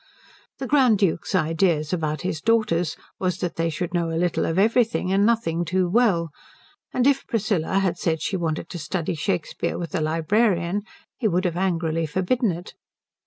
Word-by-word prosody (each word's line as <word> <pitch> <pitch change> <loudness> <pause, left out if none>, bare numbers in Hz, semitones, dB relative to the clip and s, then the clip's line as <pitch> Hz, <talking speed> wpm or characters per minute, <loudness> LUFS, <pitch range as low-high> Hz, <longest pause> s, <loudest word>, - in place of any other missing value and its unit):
The 270 - -4
Grand 260 -6 +4
Duke's 190 -1 0
idea 165 -1 +2
about 155 -4 -1
his 170 -3 -3
daughters 215 -8 +1 0.2
was 180 -2 0
that 180 -2 -3
they 165 0 0
should 175 +2 -4
know 170 -1 0
a 165 - -2
little 175 0 0
of 165 - -1
everything 225 -2 +2
and 200 +2 +3
nothing 175 -8 +1
too 180 +2 +1
well; 180 -6 +2 0.6
and 250 - +1
if 275 -1 +2
Priscilla 200 -6 0
had 185 -3 0
said 160 -1 0
she 190 - -2
wanted 165 -2 -2
to 175 - -6
study 165 +2 -2
Shakespeare 170 +2 -2
with 170 -2 -5
the 185 - -1
librarian 175 +4 +1 0.4
he 235 - +1
would 185 -1 +1
have 175 -2 0
angrily 165 -3 0
forbidden 190 - +1
it. 175 +1 -8
180 Hz, 175 wpm, -24 LUFS, 165-205 Hz, 0.6 s, Grand